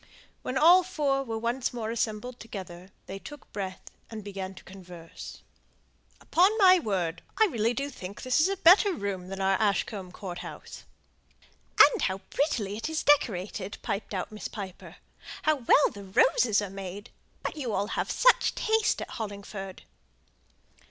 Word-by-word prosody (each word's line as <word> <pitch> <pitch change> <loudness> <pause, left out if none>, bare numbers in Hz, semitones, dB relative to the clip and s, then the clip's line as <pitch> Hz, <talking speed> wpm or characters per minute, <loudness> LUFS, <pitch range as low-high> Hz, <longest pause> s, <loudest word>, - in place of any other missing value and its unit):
When 255 - -3
all 345 +6 +7
four 295 -7 0
were 230 -4 -4
once 235 +3 -2
more 225 -2 -3
assembled 235 +2 -3
together, 185 -4 -9 0.2
they 195 +1 -7
took 295 +7 -12
breath, 190 -2 -6 0.2
and 220 -2 -7
began 195 -1 -6
to - - -13
converse. 180 -3 -11 0.8
"Upon 385 +6 +3
my 370 -3 +7
word, 180 - -2 0.2
I 440 - +6
really 235 - 0
do 280 +3 -3
think 195 -4 -9
this 255 +3 +2
is 330 - +4
a 390 - -2
better 380 +2 +6
room 195 - -4
than 195 +1 -6
our 195 0 +1
Ashcombe 200 -2 -1
Court 180 -1 -7
house!" - - -9 0.9
"And 470 - +7
how 190 0 0
prettily 230 -9 0
it 225 - -4
is 320 -1 -2
decorated!" 205 -8 +1
piped 200 0 -3
out 185 - -3
Miss 215 - -6
Piper. 195 -4 -8 0.5
"How 310 -1 +3
well 270 +3 +4
the 200 -1 -10
roses 210 +2 +3
are 200 - -6
made! 195 +1 -8 0.3
But - - -3
you 265 -7 -3
all 205 +1 -1
have - - -2
such - - +4
taste 440 -1 +1
at - - -10
Hollingford." 200 -2 -7
215 Hz, 160 wpm, -28 LUFS, 195-280 Hz, 0.9 s, all